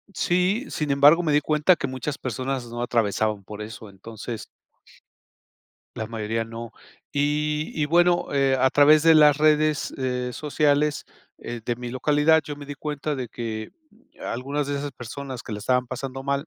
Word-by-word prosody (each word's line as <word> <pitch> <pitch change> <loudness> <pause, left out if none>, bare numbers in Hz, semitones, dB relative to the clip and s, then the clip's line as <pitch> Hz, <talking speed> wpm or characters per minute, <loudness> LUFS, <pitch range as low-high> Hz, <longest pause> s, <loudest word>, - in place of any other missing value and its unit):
sí, 185 +8 +1
sin 150 -2 -2
embargo, 145 +5 +6
me 155 - +1
di 150 - +5
cuenta 155 +4 +3
que - - -4
muchas 130 +2 -4
personas 130 +1 -3
no 120 +1 -6
atravesaban 110 -3 0
por 105 +2 -9
eso, 110 0 -9
entonces 110 +3 -8 1.5
la 110 - -4
mayoría 115 0 -3
no.Y 145 +6 -3
y, - - +3
bueno, 175 +2 +3
eh, 135 -1 +2
a 130 +1 +3
través 150 +2 +6
de 165 0 +6
las 150 -1 +6
redes, 155 0 +2
eh, 125 -1 -2
sociales 150 +1 +1 0.3
de 120 0 -4
mi 120 0 -6
localidad, 150 +5 +3
yo 145 - -6
me 145 0 -10
di 145 - -6
cuenta 150 +1 -3
de 130 -3 -5
que 110 -2 -5 0.5
algunas 140 +4 -3
de 145 - -2
esas 145 +1 -4
personas 130 +1 -7
que 115 - -7
la 105 - -5
estaban 125 +3 +1
pasando 135 +1 -6
mal, 140 +2 -1
140 Hz, 165 wpm, -24 LUFS, 120-150 Hz, 1.5 s, embargo